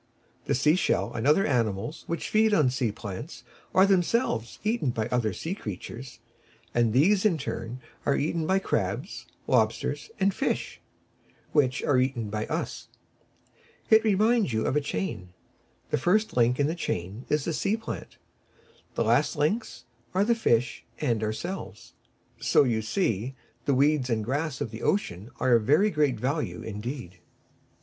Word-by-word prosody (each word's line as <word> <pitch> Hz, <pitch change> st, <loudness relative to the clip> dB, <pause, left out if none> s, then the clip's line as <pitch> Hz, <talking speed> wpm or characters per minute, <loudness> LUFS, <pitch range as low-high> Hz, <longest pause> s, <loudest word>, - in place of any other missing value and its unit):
The -, -, +1 dB
shell 150 Hz, +7 st, +2 dB
fish, -, -, -11 dB
and 115 Hz, +4 st, -1 dB
other 155 Hz, +7 st, +5 dB
animals 115 Hz, 0 st, -1 dB
which 170 Hz, -, -3 dB
feed 215 Hz, 0 st, +4 dB
on 145 Hz, -7 st, +4 dB
sea 125 Hz, -4 st, 0 dB
plants, 115 Hz, -, -7 dB, 0.3 s
are 190 Hz, -, +6 dB
themselves 180 Hz, -, +1 dB
eaten 215 Hz, -, +1 dB
by 110 Hz, -3 st, -1 dB
other 120 Hz, -4 st, +1 dB
sea 160 Hz, -, -4 dB
creatures, 115 Hz, -, -7 dB, 0.6 s
and 120 Hz, -2 st, +3 dB
these 185 Hz, -, +4 dB
in 215 Hz, -4 st, +4 dB
their -, -, -2 dB
turn 120 Hz, +1 st, -5 dB, 0.2 s
are 140 Hz, -, +2 dB
eaten 160 Hz, +2 st, -1 dB
by 190 Hz, -, +3 dB
crabs, 195 Hz, -, -2 dB, 0.2 s
lobsters -, -, +1 dB
and 195 Hz, 0 st, +3 dB
fish, 275 Hz, -, -2 dB, 0.7 s
which 135 Hz, -3 st, +2 dB
are 130 Hz, -3 st, +3 dB
eaten 125 Hz, -5 st, -1 dB
by 105 Hz, 0 st, -2 dB
us. -, -, -4 dB, 1.0 s
It 220 Hz, 0 st, +7 dB
reminds 215 Hz, -, +3 dB
you 110 Hz, 0 st, 0 dB
of -, -, 0 dB
a 150 Hz, -, +3 dB
chain. 90 Hz, -7 st, -4 dB, 0.6 s
The -, -, +2 dB
first 210 Hz, -, +2 dB
link 125 Hz, +1 st, +3 dB
in 145 Hz, -, +3 dB
the 155 Hz, -, 0 dB
chain 100 Hz, -, -4 dB
is 150 Hz, -2 st, +1 dB
the 165 Hz, -, -1 dB
sea 200 Hz, +7 st, 0 dB
plant, 225 Hz, -, -7 dB, 0.8 s
the -, -, +1 dB
last -, -, +2 dB
links 150 Hz, -, -1 dB, 0.3 s
are 195 Hz, +2 st, +3 dB
the 235 Hz, -, +4 dB
fish 120 Hz, -, +1 dB, 0.2 s
and 120 Hz, -7 st, 0 dB
ourselves. 110 Hz, -, -5 dB, 0.5 s
So, -, -, +4 dB
you 115 Hz, -4 st, +1 dB
see, 115 Hz, -, -1 dB, 0.3 s
the 140 Hz, -, +2 dB
weeds 140 Hz, -1 st, +3 dB
and 110 Hz, -2 st, 0 dB
grass 140 Hz, +2 st, -2 dB
of 110 Hz, -, -2 dB
the 115 Hz, 0 st, -8 dB
ocean 105 Hz, -, -1 dB
are 130 Hz, -, +3 dB
of 115 Hz, -2 st, +4 dB
very 195 Hz, -, +4 dB
great 145 Hz, -, +1 dB
value 140 Hz, +6 st, -2 dB
indeed. 105 Hz, -3 st, -6 dB
135 Hz, 160 wpm, -27 LUFS, 115-175 Hz, 1.0 s, It